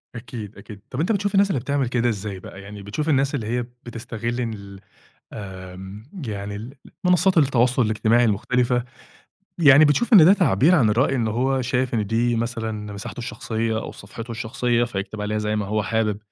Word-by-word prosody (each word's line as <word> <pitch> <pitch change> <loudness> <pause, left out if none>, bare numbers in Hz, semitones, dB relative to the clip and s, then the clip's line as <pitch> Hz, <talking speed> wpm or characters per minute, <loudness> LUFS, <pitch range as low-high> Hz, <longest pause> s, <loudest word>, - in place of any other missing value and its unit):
أكيد، 115 -3 -8
أكيد، 105 -3 -11
طَب 130 - -5
أنت 170 +8 +1
بتشوف 205 0 0
الناس 200 0 +4
اللي 140 - 0
بتعمل 140 +1 -1
كده 120 -1 +1
إزاي 100 -3 -4
بقى؟ 95 +1 -11
يعني 100 0 -10
بتشوف 105 +11 -3
الناس 140 0 +2
اللي 110 -5 -3
هي 120 +2 0 0.2
بتستغل 120 +1 -4
ال 100 -4 -6 0.5
آمم 95 0 -8 0.2
يعني 105 +4 -6 0.3
المنصّات 180 0 +4
التواصل 130 -3 +3
الاجتماعي 110 +2 +2
المختلفة، 120 +3 +1 0.7
يعني 145 -2 +7
بتشوف 195 - +2
إن 180 -7 +10
ده 185 - +8
تعبير 170 - +4
عن 120 -10 +4
الرأي، 130 +5 +2
إن 115 -2 0
هو 130 +4 0
شايف 130 0 -1
إن 105 -3 0
دي 115 +2 +1
مثلًا 110 -3 -3
مساحته 100 +4 -8
الشخصية، 115 -2 -2
أو - - -6
صفحته 115 +1 -10
الشخصية، 120 +1 0
فيكتب 105 -2 -5
عليها 105 +1 -1
زي 105 0 -1
ما 105 -2 -2
هو 105 +1 0
حابب؟ 110 -2 0
115 Hz, 175 wpm, -23 LUFS, 105-130 Hz, 0.7 s, إن